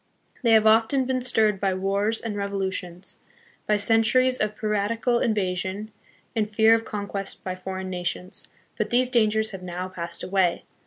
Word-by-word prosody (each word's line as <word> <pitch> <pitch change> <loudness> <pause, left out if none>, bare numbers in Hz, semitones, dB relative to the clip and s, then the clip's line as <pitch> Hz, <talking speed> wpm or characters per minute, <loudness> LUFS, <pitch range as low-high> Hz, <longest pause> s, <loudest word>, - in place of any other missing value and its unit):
They 230 -3 +4
have 220 -1 +5
often 225 +5 +4
been 255 0 -1
stirred 220 -5 +2
by 195 -1 0
wars 200 +4 0
and 225 -3 -5
revo 200 0 -3
lutions, 180 -1 -4 0.5
by 210 - +3
centuries 225 +4 +3
of 215 0 -1
piratical 220 +3 0
invasion, 195 0 -1 0.4
and 215 -2 0
fear 220 +1 +5
of 225 0 +2
con 205 -2 -4
quest 195 -1 -5
by 185 - -3
foreign 185 0 -6
nations. 180 +1 -4 0.3
But - - 0
these 250 +1 +2
dangers 220 -2 +3
have 190 -2 -8
now 180 +1 -5
passed 170 -2 -4
away. 185 -2 +1
210 Hz, 165 wpm, -25 LUFS, 190-225 Hz, 0.5 s, have